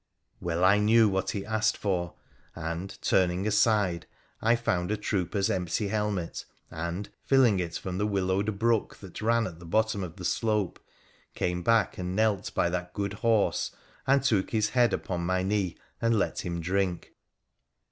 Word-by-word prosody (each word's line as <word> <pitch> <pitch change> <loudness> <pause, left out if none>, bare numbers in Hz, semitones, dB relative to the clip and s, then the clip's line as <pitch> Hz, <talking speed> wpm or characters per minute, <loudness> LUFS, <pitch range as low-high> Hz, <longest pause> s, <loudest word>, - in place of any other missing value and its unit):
Well 85 +1 -1
I 100 +3 +6
knew 110 +2 +5
what 95 -1 0
he 100 -1 -3
asked 110 0 +1
for, 90 -4 -2 0.4
and, 85 +3 -5
turning 90 +1 +2
aside, 105 -5 +2 0.3
I 115 +2 +4
found 90 -6 -1
a 105 - 0
trooper's 100 -1 -1
empty 90 +2 -1
helmet, 105 -5 -2 0.3
and, 85 +5 -4 0.2
filling 125 -8 +4
it 85 -2 -3
from 95 0 -4
the 105 - +1
willowed 100 +1 0
brook 115 0 +1
that 95 0 -10
ran 115 +1 +2
at 85 -4 -7
the 85 - -11
bottom 110 +2 +1
of 85 -3 -7
the - - -7
slope, 105 -5 0 0.6
came 90 0 -1
back 115 -1 +2
and 90 0 -3
knelt 110 -3 +1
by - - +2
that 90 0 -4
good 100 -1 -2
horse, 110 -1 +1 0.3
and 135 0 +4
took 105 -8 +2
his 105 -1 +1
head 120 0 +3
upon 90 -2 -2
my 95 +1 0
knee 95 -2 -1 0.2
and 115 -1 +3
let 100 - -1
him 85 -2 -3
drink. 95 0 -1
100 Hz, 165 wpm, -28 LUFS, 90-110 Hz, 0.6 s, I